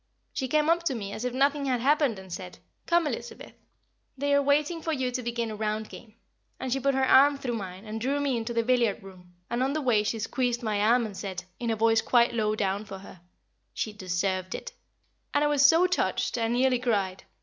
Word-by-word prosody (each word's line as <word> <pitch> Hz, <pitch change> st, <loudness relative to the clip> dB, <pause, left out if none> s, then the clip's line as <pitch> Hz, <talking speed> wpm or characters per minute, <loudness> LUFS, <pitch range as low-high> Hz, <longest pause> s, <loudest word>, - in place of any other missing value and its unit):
She 260 Hz, -, -2 dB
came 300 Hz, +3 st, +2 dB
up 335 Hz, +1 st, +3 dB
to 275 Hz, -6 st, 0 dB
me 200 Hz, -3 st, -5 dB
as 235 Hz, -, -5 dB
if 250 Hz, -, -1 dB
nothing 280 Hz, +1 st, +2 dB
had 255 Hz, -2 st, 0 dB
happened, 280 Hz, -3 st, +2 dB
and 190 Hz, -2 st, -9 dB
said, 180 Hz, -1 st, -7 dB, 0.3 s
"Come, 340 Hz, -1 st, +3 dB
Elizabeth, 295 Hz, -, -6 dB, 0.6 s
they 285 Hz, +1 st, 0 dB
are 285 Hz, -, +5 dB
waiting 295 Hz, +4 st, +1 dB
for 325 Hz, -, -2 dB
you 260 Hz, -4 st, -1 dB
to 250 Hz, +1 st, -3 dB
begin 235 Hz, -1 st, -3 dB
a -, -, -5 dB
round 215 Hz, 0 st, -2 dB
game," 220 Hz, -2 st, -13 dB, 0.4 s
and 255 Hz, -2 st, -2 dB
she 270 Hz, -, 0 dB
put 275 Hz, 0 st, +1 dB
her 265 Hz, 0 st, +2 dB
arm 280 Hz, +2 st, +6 dB
through 265 Hz, -3 st, -3 dB
mine 190 Hz, -2 st, -6 dB
and 220 Hz, +1 st, -5 dB
drew 275 Hz, +4 st, 0 dB
me 280 Hz, -3 st, 0 dB
into 230 Hz, 0 st, -3 dB
the 230 Hz, -1 st, +1 dB
billiard 235 Hz, -4 st, +1 dB
room, 180 Hz, -2 st, -14 dB
and 240 Hz, +1 st, -2 dB
on 270 Hz, +2 st, +1 dB
the 310 Hz, -, -1 dB
way 240 Hz, -6 st, +3 dB
she 215 Hz, +2 st, -2 dB
squeezed 240 Hz, +2 st, -1 dB
my 215 Hz, -2 st, 0 dB
arm, 235 Hz, +3 st, +3 dB
and 210 Hz, -3 st, -7 dB
said, 190 Hz, -2 st, -5 dB, 0.2 s
in 235 Hz, -, -2 dB
a 225 Hz, -, +1 dB
voice 225 Hz, +1 st, +3 dB
quite 240 Hz, -1 st, +3 dB
low 215 Hz, -2 st, 0 dB
down 200 Hz, 0 st, -1 dB
for 195 Hz, -2 st, -8 dB
her, 190 Hz, -2 st, -13 dB, 0.5 s
"She 215 Hz, -, -3 dB
deserved 185 Hz, -1 st, -2 dB
it," -, -, -7 dB, 0.6 s
and 290 Hz, -, +4 dB
I -, -, +3 dB
was 290 Hz, -1 st, +3 dB
so 325 Hz, +5 st, +6 dB
touched 365 Hz, -, 0 dB
I 230 Hz, -2 st, 0 dB
nearly 250 Hz, +2 st, +2 dB
cried. 200 Hz, -6 st, -1 dB
235 Hz, 230 wpm, -27 LUFS, 210-275 Hz, 0.6 s, arm